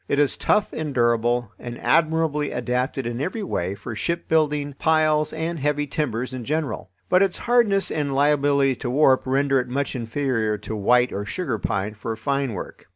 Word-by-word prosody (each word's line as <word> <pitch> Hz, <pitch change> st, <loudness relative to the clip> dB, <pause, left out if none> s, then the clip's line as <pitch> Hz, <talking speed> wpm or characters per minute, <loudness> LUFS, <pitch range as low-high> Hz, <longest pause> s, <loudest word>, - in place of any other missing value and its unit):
It 140 Hz, -, 0 dB
is 145 Hz, -1 st, +3 dB
tough 210 Hz, -, +1 dB
and 150 Hz, -4 st, -4 dB
durable 120 Hz, -1 st, +1 dB
and 120 Hz, 0 st, -7 dB
admirably 160 Hz, -2 st, +1 dB
adapted 125 Hz, +2 st, -2 dB
in 120 Hz, +2 st, -3 dB
every 190 Hz, +8 st, -3 dB
way 95 Hz, -, -2 dB
for 110 Hz, +3 st, -7 dB
shipbuilding, 150 Hz, -1 st, 0 dB
piles, 155 Hz, -1 st, +2 dB
and 160 Hz, +1 st, -3 dB
heavy 145 Hz, +1 st, 0 dB
timbers 130 Hz, -4 st, -3 dB
in 130 Hz, -2 st, -5 dB
general. 150 Hz, -6 st, -3 dB, 0.2 s
But 185 Hz, 0 st, +4 dB
its 195 Hz, -2 st, +2 dB
hardness 235 Hz, -5 st, +2 dB
and 145 Hz, -3 st, -1 dB
liability 140 Hz, -2 st, +3 dB
to 120 Hz, -, -4 dB
warp 135 Hz, 0 st, +4 dB
render 135 Hz, +1 st, +2 dB
it 125 Hz, -, -3 dB
much 140 Hz, +3 st, -2 dB
inferior 115 Hz, -3 st, -1 dB
to 105 Hz, +2 st, -6 dB
white 125 Hz, +4 st, +3 dB
or 100 Hz, -, -3 dB
sugar 175 Hz, -, -3 dB
pine 100 Hz, +2 st, -2 dB
for 110 Hz, +1 st, -5 dB
fine 135 Hz, +2 st, -1 dB
work. 95 Hz, -, -8 dB
140 Hz, 175 wpm, -23 LUFS, 120-155 Hz, 0.2 s, But